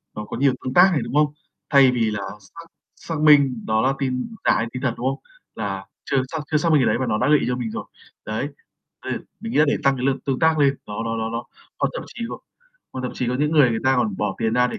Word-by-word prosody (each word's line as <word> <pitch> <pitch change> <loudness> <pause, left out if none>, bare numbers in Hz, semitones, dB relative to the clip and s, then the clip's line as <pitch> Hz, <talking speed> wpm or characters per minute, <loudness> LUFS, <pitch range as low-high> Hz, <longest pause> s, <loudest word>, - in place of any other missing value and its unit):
nó 105 - -5
có 115 - -6
nhiều 135 0 +3
tương 130 - -2
tác 180 +2 +7
này, 145 - +1
đúng - - -7
không? 150 -1 +3 0.4
Thay 135 -3 +6
vì 115 -3 0
là 105 -1 -3 0.2
xác 165 +12 -13 0.3
xác 165 -2 -5
minh 140 -6 +5
đó 110 0 +2
là 135 +1 +2
tin 135 - -2
giả - - +5
hay 115 - -1
tin 130 - -5
thật, 130 -4 0
đúng 125 - -2
không? 135 +1 -1 0.4
Là - - -4 0.2
chưa 135 - 0
xác 160 - -3
chưa 150 - +4
xác 170 +2 +1
minh 150 - +5
cái - - +3
đấy - - +2
mà 130 - 0
nó 105 - +1
đã - - +1
gợi 150 - +6
ý - - -2
cho 125 - 0
mình 120 -3 -4
rồi. - - -5 0.4
Đấy, 110 +6 -2 0.6
bây - - -3
giờ - - -2 0.2
mình 230 +1 -5
nghĩ - - +1
là 155 - +7
để - - +2
tăng 135 -1 +4
cái 125 - -3
lượt 135 - +2
tương 135 -2 0
tác 160 -1 +3
lên, 140 -1 +4
nó 105 +1 -4
nó 115 0 -2
nó 110 0 -2
nó 115 +1 -4 0.4
hoặc - - +2
thậm - - -5
chí 235 - -8
có - - -6 0.5
hoặc 130 - -5
thậm 125 - -3
chí 125 - -2
có 125 - 0
những 150 +1 +1
người 145 -6 +5
người 115 - -1
ta 130 0 +4
còn 210 -3 0
bỏ - - -1
tiền 110 - 0
ra 125 0 +4
để 225 - -5
130 Hz, 295 wpm, -22 LUFS, 120-150 Hz, 0.6 s, tác